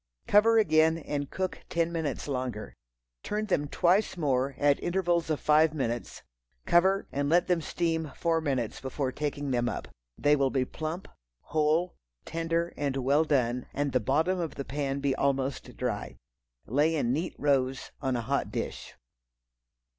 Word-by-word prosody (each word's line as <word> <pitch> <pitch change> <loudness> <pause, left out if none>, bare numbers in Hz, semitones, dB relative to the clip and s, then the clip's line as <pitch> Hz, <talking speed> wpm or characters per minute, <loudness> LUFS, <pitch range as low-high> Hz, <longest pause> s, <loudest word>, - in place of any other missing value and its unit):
Cover 225 +2 +5
again 160 -5 +4
and 145 -3 -4
cook 185 -1 -3
ten 170 0 0
minutes 160 -5 -3
longer. 125 -6 -3 0.5
Turn 210 +1 -2
them 145 -8 0
twice 180 +6 +2
more, 135 -3 0
at 145 -1 +3
intervals 175 -2 0
of 155 - 0
five 155 +1 +4
minutes, 120 -4 -3 0.4
cover, 190 +3 +3
and 140 +1 -1
let 175 +2 +4
them 175 -2 +1
steam 160 -2 -1
four 165 -1 +1
minutes 130 -7 -2
before 130 0 -2
taking 145 0 -3
them 120 -1 +1
up. - - -5 0.3
They 145 0 +4
will 135 -2 +2
be 130 -1 0
plump, 160 +7 -5 0.3
whole, 155 +4 +1 0.3
tender 165 +1 -1
and 140 -2 -1
well 140 +4 +3
done, 125 -4 +1
and 145 0 0
the 130 - +2
bottom 160 - +1
of 165 -3 -3
the 140 - -5
pan 140 -1 -2
be 140 -1 +1
almost 135 -2 -1
dry. 120 -5 -3 0.5
Lay 150 +7 +2
in 125 -5 +1
neat 165 +6 -2
rows 135 -2 0
on 130 -2 0
a 120 - -1
hot 115 - -1
dish. - - -5
145 Hz, 160 wpm, -29 LUFS, 135-165 Hz, 0.5 s, Cover